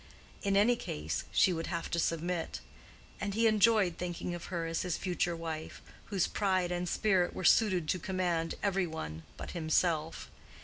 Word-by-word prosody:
In 200 Hz, -1 st, +2 dB
any 225 Hz, +5 st, +5 dB
case, 75 Hz, -, -4 dB
she 185 Hz, -, +4 dB
would 165 Hz, -1 st, -3 dB
have 170 Hz, -2 st, -3 dB
to 170 Hz, -, +1 dB
submit; 165 Hz, +1 st, -1 dB, 0.6 s
and 200 Hz, 0 st, -3 dB
he 230 Hz, +1 st, +3 dB
enjoyed 215 Hz, -4 st, +4 dB
thinking 175 Hz, 0 st, -3 dB
of 175 Hz, -, -6 dB
her 170 Hz, -2 st, -3 dB
as 165 Hz, 0 st, -1 dB
his 180 Hz, -2 st, -1 dB
future 175 Hz, -2 st, -1 dB
wife, 160 Hz, -1 st, -5 dB, 0.3 s
whose 195 Hz, -4 st, +1 dB
pride 185 Hz, -3 st, 0 dB
and 175 Hz, 0 st, -1 dB
spirit 190 Hz, -5 st, +2 dB
were -, -, -4 dB
suited 185 Hz, -5 st, +4 dB
to 185 Hz, -, +1 dB
command 175 Hz, -2 st, -1 dB
every 195 Hz, -2 st, +1 dB
one 80 Hz, -, -6 dB, 0.2 s
but -, -, -6 dB
himself. 160 Hz, -1 st, 0 dB
175 Hz, 170 wpm, -32 LUFS, 165-195 Hz, 0.6 s, any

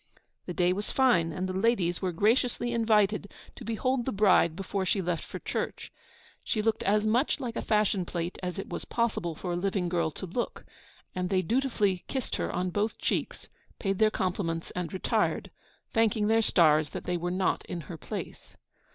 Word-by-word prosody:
The 180 Hz, -, -3 dB
day 180 Hz, 0 st, +3 dB
was 205 Hz, +2 st, -4 dB
fine, 210 Hz, -12 st, +3 dB
and 185 Hz, +4 st, -2 dB
the 185 Hz, -, -3 dB
ladies 190 Hz, -4 st, +1 dB
were 185 Hz, -2 st, 0 dB
graciously 235 Hz, +6 st, +1 dB
invited 210 Hz, -3 st, +2 dB, 0.2 s
to -, -, -10 dB
behold 240 Hz, +2 st, 0 dB
the 265 Hz, -, -1 dB
bride 190 Hz, -5 st, +4 dB
before 195 Hz, +1 st, -2 dB
she 190 Hz, +2 st, +1 dB
left 175 Hz, -3 st, -1 dB
for -, -, -7 dB
church. -, -, -4 dB, 0.5 s
She 215 Hz, -3 st, -1 dB
looked 225 Hz, 0 st, +1 dB
as 210 Hz, +2 st, +2 dB
much 245 Hz, +8 st, +2 dB
like 240 Hz, -4 st, -4 dB
a -, -, -1 dB
fashion 210 Hz, -3 st, +2 dB
plate 175 Hz, 0 st, -4 dB
as 180 Hz, +1 st, -4 dB
it 195 Hz, -, -4 dB
was -, -, -4 dB
possible 225 Hz, -8 st, -1 dB
for 180 Hz, +3 st, -4 dB
a -, -, 0 dB
living 185 Hz, 0 st, 0 dB
girl 170 Hz, -2 st, +1 dB
to 155 Hz, -, -7 dB
look; 215 Hz, +7 st, -4 dB, 0.5 s
and 180 Hz, -1 st, -2 dB
they 185 Hz, -1 st, +2 dB
dutifully 210 Hz, -4 st, +1 dB
kissed 265 Hz, -3 st, -3 dB
her -, -, -2 dB
on 180 Hz, 0 st, -1 dB
both 210 Hz, +4 st, -1 dB
cheeks, -, -, -2 dB, 0.3 s
paid 195 Hz, -2 st, -1 dB
their 220 Hz, -1 st, +6 dB
compliments 180 Hz, -4 st, -2 dB
and 180 Hz, -3 st, -4 dB
retired, 190 Hz, -, 0 dB, 0.4 s
thanking 225 Hz, -2 st, +3 dB
their 225 Hz, +1 st, +4 dB
stars 155 Hz, -7 st, +4 dB
that -, -, -6 dB
they 180 Hz, -, -1 dB
were 175 Hz, +1 st, -2 dB
not 185 Hz, +1 st, 0 dB
in 175 Hz, -, -4 dB
her 170 Hz, -, -8 dB
place. -, -, -7 dB
195 Hz, 190 wpm, -29 LUFS, 180-220 Hz, 0.5 s, their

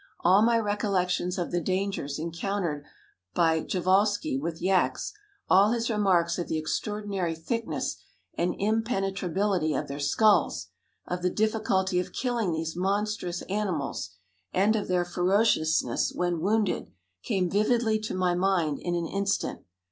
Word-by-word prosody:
All 185 Hz, +4 st, +5 dB
my 230 Hz, +1 st, +4 dB
recollections 195 Hz, -4 st, 0 dB
of 175 Hz, -, -2 dB
the 175 Hz, -, 0 dB
dangers 185 Hz, -5 st, -2 dB
encountered 170 Hz, -1 st, -3 dB, 0.5 s
by 160 Hz, -2 st, +3 dB
Prjevalsky 190 Hz, 0 st, +1 dB
with 165 Hz, +1 st, -4 dB
yaks, 185 Hz, -, +1 dB, 0.3 s
all 200 Hz, +4 st, +5 dB
his 235 Hz, 0 st, -1 dB
remarks 185 Hz, -5 st, +2 dB
of 175 Hz, -, -3 dB
the 160 Hz, -, -1 dB
extraordinary 195 Hz, +1 st, -2 dB
thickness 230 Hz, +8 st, -3 dB, 0.4 s
and 175 Hz, +1 st, -1 dB
impenetrability 195 Hz, -5 st, 0 dB
of 145 Hz, -, -2 dB
their 140 Hz, +1 st, -6 dB
skulls, 205 Hz, +9 st, +2 dB, 0.4 s
of 180 Hz, 0 st, -3 dB
the 180 Hz, -, +2 dB
difficulty 195 Hz, -3 st, +1 dB
of 180 Hz, -, -4 dB
killing 240 Hz, -7 st, -1 dB
these 160 Hz, 0 st, -3 dB
monstrous 195 Hz, -1 st, -1 dB
animals, 180 Hz, -, -2 dB, 0.4 s
and 205 Hz, +4 st, +3 dB
of 210 Hz, -, -2 dB
their 180 Hz, -1 st, +1 dB
ferociousness 175 Hz, -2 st, +2 dB
when 175 Hz, -2 st, 0 dB
wounded, 210 Hz, +1 st, 0 dB, 0.3 s
came 185 Hz, -, 0 dB
vividly 215 Hz, +3 st, +2 dB
to 215 Hz, -2 st, -4 dB
my 180 Hz, -1 st, +1 dB
mind 175 Hz, -5 st, +1 dB
in 175 Hz, 0 st, -2 dB
an 170 Hz, -1 st, -1 dB
instant. 200 Hz, +3 st, -1 dB
185 Hz, 135 wpm, -27 LUFS, 170-210 Hz, 0.5 s, All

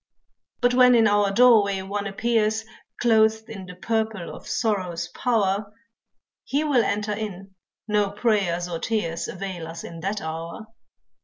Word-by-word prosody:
But 245 Hz, 0 st, +3 dB
when 250 Hz, 0 st, +6 dB
in 225 Hz, -1 st, +5 dB
our 205 Hz, -1 st, +3 dB
doorway 210 Hz, -3 st, +5 dB
one 200 Hz, +1 st, -3 dB
appears 220 Hz, +1 st, 0 dB, 0.3 s
Clothed 220 Hz, -1 st, +3 dB
in 195 Hz, -5 st, -8 dB
the 180 Hz, -, -9 dB
purple 220 Hz, -1 st, -2 dB
of -, -, -13 dB
sorrow's 190 Hz, -7 st, -1 dB
power, 205 Hz, -4 st, 0 dB, 0.7 s
He 285 Hz, +3 st, 0 dB
will 275 Hz, -6 st, +3 dB
enter 210 Hz, +1 st, -1 dB
in, 195 Hz, -2 st, -6 dB, 0.3 s
no 210 Hz, -1 st, +2 dB
prayers 200 Hz, -5 st, 0 dB
or 170 Hz, -2 st, -4 dB
tears 170 Hz, -7 st, -2 dB
Avail 185 Hz, -3 st, -6 dB
us 165 Hz, +1 st, -8 dB
in 165 Hz, -, -8 dB
that 195 Hz, +4 st, -2 dB
hour. 165 Hz, +6 st, -6 dB
205 Hz, 145 wpm, -24 LUFS, 185-225 Hz, 0.7 s, when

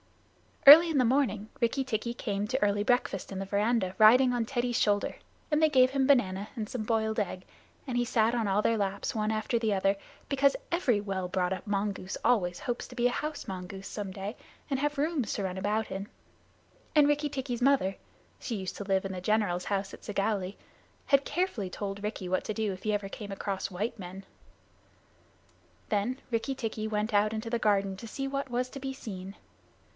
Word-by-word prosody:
Early 320 Hz, +5 st, +11 dB
in 315 Hz, -, 0 dB
the 250 Hz, -, +4 dB
morning 230 Hz, -5 st, +1 dB
Rikki 240 Hz, +4 st, +1 dB
tikki 235 Hz, -2 st, -2 dB
came 205 Hz, -4 st, -2 dB
to 260 Hz, +4 st, -1 dB
early 205 Hz, 0 st, +2 dB
breakfast 245 Hz, -1 st, 0 dB
in 195 Hz, -, -5 dB
the 195 Hz, -, -3 dB
veranda 205 Hz, -1 st, +1 dB
riding 250 Hz, +4 st, +7 dB
on 240 Hz, -2 st, 0 dB
Teddy's 245 Hz, -1 st, -1 dB
shoulder, 205 Hz, -1 st, +1 dB, 0.4 s
and 300 Hz, +1 st, +3 dB
they 315 Hz, -, +5 dB
gave 255 Hz, -3 st, +5 dB
him 270 Hz, -1 st, +1 dB
banana 205 Hz, -7 st, +2 dB
and 215 Hz, -2 st, -3 dB
some 235 Hz, 0 st, -4 dB
boiled 220 Hz, 0 st, 0 dB
egg. 185 Hz, -2 st, -3 dB, 0.4 s
He 245 Hz, -1 st, 0 dB
sat 230 Hz, -2 st, +2 dB
on 230 Hz, -3 st, 0 dB
all 200 Hz, +2 st, +2 dB
their 230 Hz, -, +2 dB
laps 200 Hz, -1 st, -2 dB
one 215 Hz, -1 st, 0 dB
after 220 Hz, +2 st, 0 dB
the 220 Hz, -2 st, +1 dB
other, 195 Hz, 0 st, +2 dB, 0.3 s
because 275 Hz, 0 st, +3 dB, 0.2 s
every 260 Hz, -, +2 dB
well 195 Hz, -3 st, -3 dB
brought 180 Hz, 0 st, 0 dB
up 190 Hz, -, -7 dB
mongoose 200 Hz, -2 st, -2 dB
always 180 Hz, -7 st, +2 dB
hopes 245 Hz, -1 st, -3 dB
to 250 Hz, -, -12 dB
be 240 Hz, -1 st, 0 dB
a -, -, 0 dB
house 300 Hz, +3 st, -4 dB
mongoose 190 Hz, +1 st, -6 dB
some 205 Hz, -3 st, -5 dB
day 195 Hz, +4 st, -5 dB, 0.3 s
and 270 Hz, -2 st, 0 dB
have 295 Hz, +1 st, -1 dB
rooms 290 Hz, -6 st, 0 dB
to 205 Hz, -, -2 dB
run 185 Hz, -1 st, -3 dB
about 210 Hz, +3 st, -1 dB
in; 195 Hz, +1 st, -4 dB, 0.9 s
and 295 Hz, -1 st, +6 dB
Rikki 295 Hz, 0 st, +1 dB
tikki's 260 Hz, -3 st, -4 dB
mother 245 Hz, -8 st, +3 dB, 0.4 s
(she 235 Hz, -, -4 dB
used 190 Hz, -3 st, -4 dB
to -, -, -4 dB
live 195 Hz, -1 st, +1 dB
in 195 Hz, -, -3 dB
the 185 Hz, -1 st, -5 dB
general's 195 Hz, -3 st, +1 dB
house 200 Hz, -1 st, -2 dB
at -, -, -11 dB
Segowlee) 200 Hz, -2 st, -1 dB, 0.5 s
had 275 Hz, -1 st, +4 dB
carefully 325 Hz, -, -1 dB
told 200 Hz, +1 st, -5 dB
Rikki 210 Hz, -3 st, -3 dB
what 185 Hz, -, 0 dB
to 215 Hz, -, -3 dB
do 215 Hz, -2 st, -1 dB
if 185 Hz, -, -11 dB
ever 205 Hz, -1 st, 0 dB
he -, -, -14 dB
came 205 Hz, -2 st, -7 dB
across 195 Hz, 0 st, -3 dB
white 205 Hz, +5 st, -3 dB
men. 190 Hz, +1 st, -8 dB, 1.6 s
Then 220 Hz, +6 st, 0 dB
Rikki 235 Hz, +4 st, -1 dB
tikki 220 Hz, -3 st, -3 dB
went 215 Hz, +1 st, -1 dB
out 210 Hz, +1 st, +3 dB
into 220 Hz, +1 st, -4 dB
the 235 Hz, -, +1 dB
garden 200 Hz, -3 st, +1 dB
to 230 Hz, -, -8 dB
see 270 Hz, +5 st, -4 dB
what 275 Hz, 0 st, -3 dB
was 250 Hz, +1 st, -1 dB
to 275 Hz, -, -7 dB
be 270 Hz, 0 st, -4 dB
seen. 195 Hz, -6 st, -8 dB
215 Hz, 200 wpm, -29 LUFS, 195-250 Hz, 1.6 s, Early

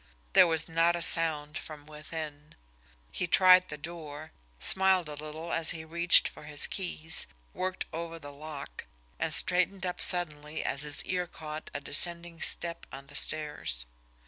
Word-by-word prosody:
There -, -, +7 dB
was 160 Hz, -1 st, +1 dB
not 165 Hz, +1 st, +2 dB
a 170 Hz, -, -4 dB
sound 155 Hz, -3 st, +2 dB
from 150 Hz, -2 st, -10 dB
within. 150 Hz, -1 st, -9 dB, 0.6 s
He 180 Hz, -, -2 dB
tried 185 Hz, +1 st, +6 dB
the 150 Hz, -, -6 dB
door, 155 Hz, -1 st, -8 dB, 0.3 s
smiled 190 Hz, -, +4 dB
a 150 Hz, -, -7 dB
little 155 Hz, +3 st, -7 dB
as 165 Hz, -1 st, +6 dB
he 160 Hz, -1 st, -2 dB
reached 170 Hz, +2 st, +4 dB
for -, -, -12 dB
his 150 Hz, -1 st, +1 dB
keys, 165 Hz, -4 st, -1 dB, 0.3 s
worked 185 Hz, 0 st, -3 dB
over 165 Hz, 0 st, -5 dB
the 145 Hz, -3 st, -11 dB
lock 145 Hz, -1 st, -9 dB, 0.3 s
and -, -, -1 dB
straightened 185 Hz, +1 st, +2 dB
up 180 Hz, -, -4 dB
suddenly 155 Hz, -4 st, -1 dB
as 140 Hz, -, -1 dB
his 150 Hz, -1 st, +1 dB
ear 180 Hz, -1 st, -2 dB
caught 155 Hz, -1 st, -8 dB
a -, -, -1 dB
descending 170 Hz, +3 st, -1 dB
step 170 Hz, -1 st, 0 dB
on 135 Hz, +1 st, -9 dB
the 145 Hz, +1 st, -15 dB
stairs. 150 Hz, -, -1 dB
160 Hz, 160 wpm, -29 LUFS, 150-175 Hz, 0.6 s, There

